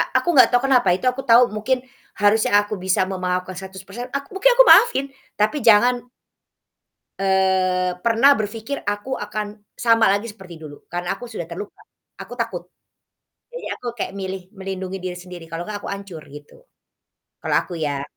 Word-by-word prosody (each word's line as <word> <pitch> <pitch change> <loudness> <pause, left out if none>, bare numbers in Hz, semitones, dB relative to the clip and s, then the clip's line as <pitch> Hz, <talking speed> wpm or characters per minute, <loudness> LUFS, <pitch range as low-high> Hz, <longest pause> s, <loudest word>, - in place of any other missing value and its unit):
kayak - - -13
aku - - -4
nggak 255 - +7
tahu 245 +1 +3
kenapa 250 -7 +3
itu 255 - -6
aku 270 +1 -6
tahu 235 +2 +8
mungkin, 250 +4 -1 0.3
harusnya 205 +2 +3
aku 205 +1 -1
bisa 185 0 +2
memaafkan 185 0 -3
100% 190 +6 -8
aku 280 +1 -4
mungkin 445 +6 +4
aku - - +9
maafin 275 - +6 0.3
tapi 215 +6 +1
jangan 240 +2 +5 1.2
eee, 185 -2 +1
pernah 235 +4 +5
berpikir 220 +6 -4
aku 205 +5 -3
akan, 210 0 -4 0.3
sama 230 -1 +3
lagi 205 +3 -1
seperti 190 -4 -12
dulu 145 -2 -12
karena 175 0 -3
aku 245 - -8
sudah 170 - -5
terluka, 200 +5 -8 0.4
aku - - -9
takut, 225 -7 -3 0.9
jadi - - -8
aku - - -16
kayak 195 - -4
milih 190 0 -4
melindungi 190 -1 -5
diri 180 -1 -5
sendiri 180 -1 -10
kalau 165 +1 -5
nggak 205 0 -6
aku - - -7
hancur 195 -5 -7
gitu. 145 - -14 0.8
Kalau - - -1
aku 180 - -10
ya. 145 -3 -2
200 Hz, 165 wpm, -21 LUFS, 185-235 Hz, 1.2 s, aku